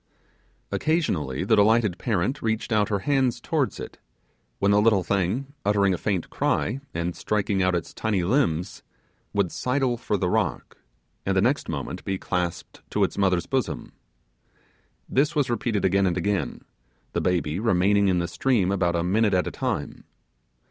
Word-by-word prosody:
Occasionally, 90 - 0
the 110 +4 +3
delighted 105 -3 +3
parent 115 +5 -1
reached 110 +1 -1
out 105 -2 +2
her 100 -2 0
hand 135 -4 +1
towards - - -1
it, - - -8 0.6
when 100 0 +2
the 105 0 +5
little 105 -4 +4
thing, 100 +10 -1
uttering 100 -2 +3
a - - -1
faint 95 -5 -2
cry, 125 +6 0
and 85 +1 -3
striking 100 -2 0
out 90 -1 +2
its 85 - -4
tiny 105 -5 -1
limbs, 95 - 0 0.5
would 100 -4 0
sidle 125 -1 0
for 105 -3 -1
the 90 - 0
rock, 95 -3 -1 0.5
and 95 0 0
the - - +6
next 130 +7 +1
moment 70 -5 -4
be 95 -1 -2
clasped 90 -2 -3
to - - +1
its - - 0
mother's 95 -3 +1
bosom. - - -2 1.2
This 150 +5 +1
was 140 -5 +1
repeated 115 -2 0
again 95 +1 +3
and 90 -1 0
again, 100 +2 -1 0.5
the - - 0
baby 90 -2 0
remaining 100 -1 +3
in 90 -2 +2
the 85 0 0
stream 100 0 +1
about 90 -3 +1
a 85 - 0
minute 100 +2 +2
at 90 - +2
a - - -3
time. - - -3
100 Hz, 165 wpm, -25 LUFS, 90-115 Hz, 1.2 s, the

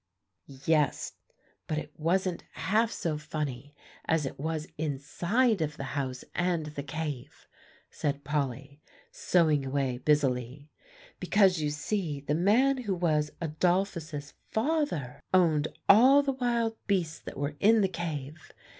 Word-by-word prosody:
"Yes; 155 -3 +1 0.5
but 155 - -1
it 155 - -5
wasn't 175 +2 0
half 220 +3 +1
so 155 -8 -2
funny, 145 -3 -5 0.3
as 160 -3 +1
it 135 - -6
was 155 +1 -2
inside 170 - 0
of 150 -1 -2
the - - -5
house 130 -3 -3
and 175 -3 0
the 150 -1 -5
cave," 145 -3 -6 0.4
said 140 -1 -2
Polly, 140 0 -3 0.3
sewing 170 - +2
away 135 -2 -1
busily; 140 -1 0 0.5
"because 190 -5 +3
you 150 - 0
see 150 0 -2
the 145 +1 -2
man 225 - +3
who 205 -6 -2
was 155 -4 +1
Adolphus's 165 -2 -1 0.2
father 220 - -1
owned 155 -5 +4 0.2
all 260 +7 +7
the 275 - +1
wild 235 -3 0
beasts 180 -6 0
that - - -9
were 145 +1 -2
in 220 +2 +5
the 195 - +3
cave. 155 -4 -5
155 Hz, 130 wpm, -29 LUFS, 145-190 Hz, 0.5 s, all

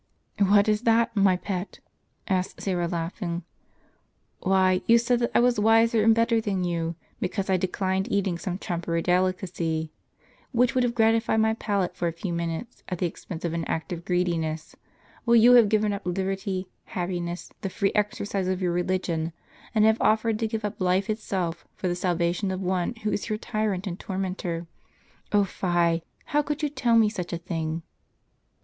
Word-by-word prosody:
"What 200 +1 +5
is 210 0 +2
that, 230 0 +3
my 195 -3 +4
pet? 185 +1 -5 0.2
" - - -43
asked 185 -2 -1
Syra, 175 -3 -1
laughing. 170 +1 -3 1.0
"Why, 185 -1 +3
you 230 - +7
said 235 +1 +2
that 235 - +1
I - - +6
was 245 -2 +3
wiser 225 +1 +4
and 225 0 +6
better 230 0 +3
than 195 -4 -1
you, 170 -1 -1 0.2
because 195 +1 -2
I 190 - +4
declined 190 +3 -1
eating 190 -4 0
some 180 -1 -3
trumpery 170 -4 -2
delicacy, 180 -3 0 0.6
which 245 0 +3
would 255 - +2
have 240 -1 0
gratified 225 -1 +3
my 220 0 +3
palate 200 -5 -1
for 175 -1 -1
a - - 0
few 170 +1 -4
minutes, 170 +7 -4
at 180 - -2
the 180 - 0
expense 170 0 -6
of 165 - -1
an 170 -1 -1
act 165 +2 -3
of 170 -1 -6
greediness; 170 -3 -1 0.5
while 235 -1 +4
you 235 +2 +7
have 235 -4 +7
given 215 -1 +2
up 200 - -4
lib 180 -1 -2
erty, 190 0 -2 0.2
happiness, 175 -1 -4
the 195 - -2
free 195 +1 0
exercise 205 -2 -1
of 185 -1 0
your 180 -2 0
religion, 175 -2 -1 0.4
and 215 0 +5
have 220 +1 +3
offered 220 0 +2
to 225 - 0
give 220 -1 -3
up 205 - -5
life 185 +3 +2
itself, 185 -6 -3
for 185 - -3
the 175 - +1
salvation 175 +2 0
of 185 -1 -2
one 185 +3 -1
who 210 - 0
is - - -2
your 215 - 0
tyrant 215 -3 -2
and 180 -2 -4
tormentor. 185 -3 -3 0.7
Oh, 205 -1 +4
fie! 175 -3 +1 0.2
how 295 - +2
could 295 +1 -4
you 300 - +2
tell 240 -5 +2
me 225 -1 +6
such 195 -5 -4
a 170 - -1
thing 165 -2 -3
190 Hz, 185 wpm, -26 LUFS, 175-215 Hz, 1.0 s, you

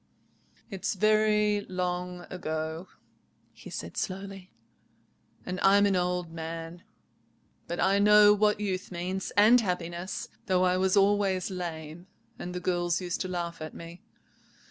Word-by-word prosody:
"It's 195 +2 -2
very 210 0 +3
long 180 -1 -3
ago," 160 0 -4 0.7
he - - -12
said - - -7
slowly, 195 -1 -5 0.9
"and 185 0 -4
I'm 200 +1 +5
an 200 -1 +2
old 180 -1 -1
man; 165 +1 -6 0.9
but 170 - -4
I 195 +1 +3
know 210 0 +7
what 210 0 +2
youth 190 -3 -3
means, 185 +2 -3
and 225 +4 +7
happiness, 180 -2 -3 0.2
though 185 -1 +2
I 180 0 +3
was 190 +1 +2
always 195 -2 +2
lame, 170 -1 -6 0.3
and 180 +1 -6
the - - -2
girls 175 -1 0
used 180 -2 -3
to 185 - -2
laugh 170 -2 -4
at 155 - -7
me. 170 +1 -10
185 Hz, 135 wpm, -28 LUFS, 175-200 Hz, 0.9 s, know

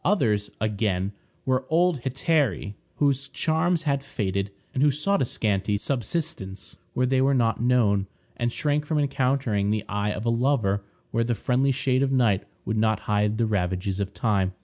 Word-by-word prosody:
Others, 110 - +2
again, 100 -3 0 0.3
were 130 0 +1
old 165 -3 +2
hetairæ 135 - 0 0.2
whose 140 -1 +1
charms 160 +3 +1
had 140 -3 0
faded, 100 -6 -2 0.2
and 130 - -1
who 150 - +6
sought 150 +9 +1
a - - +3
scanty 105 -2 0
subsistence 110 - -3 0.2
where 125 - +2
they 130 +1 +2
were 135 +1 +3
not 115 -3 +1
known, 110 -6 +3 0.3
and 120 0 -1
shrank 150 +2 0
from 150 +1 -1
encountering 130 -7 +1
the 105 0 0
eye 105 0 -1
of 105 +1 -3
a - - +2
lover 115 -5 +1 0.3
where 115 +1 +1
the 120 0 0
friendly 130 +4 +1
shade 130 -1 +1
of 135 -1 +1
night 115 -7 +2 0.2
would 110 - -1
not 110 -1 +2
hide 105 +1 +1
the 115 - +2
ravages 95 -2 -1
of 100 -1 -2
time. 100 -5 0
120 Hz, 170 wpm, -25 LUFS, 105-140 Hz, 0.3 s, who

